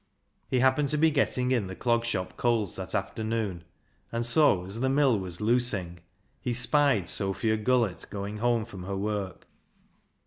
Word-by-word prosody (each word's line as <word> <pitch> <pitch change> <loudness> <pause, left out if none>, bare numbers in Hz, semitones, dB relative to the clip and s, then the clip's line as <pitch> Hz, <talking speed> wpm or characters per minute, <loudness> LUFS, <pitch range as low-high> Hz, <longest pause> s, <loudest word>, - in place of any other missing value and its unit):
He 125 - +1
happened 130 +2 +3
to 150 - +1
be 160 +1 +4
getting 130 -3 0
in 120 -7 +1
the 95 - -7
Clog 115 +1 0
Shop 100 -6 -3
coals 115 -6 0
that - - -5
afternoon, 110 -6 -2 0.5
and 115 0 -2
so 115 - +4
as 100 +4 -4
the 130 +2 +1
mill 135 -5 +3
was 90 -2 -7
"loosing" 105 -7 0 0.4
he 120 -2 -2
spied 120 - +3
Sophia 100 +3 0
Gullett 110 -5 0
going 100 +1 -5
home 115 0 +1
from 100 -5 -10
her 100 0 -3
work. 100 -2 -4
115 Hz, 165 wpm, -28 LUFS, 100-125 Hz, 0.5 s, be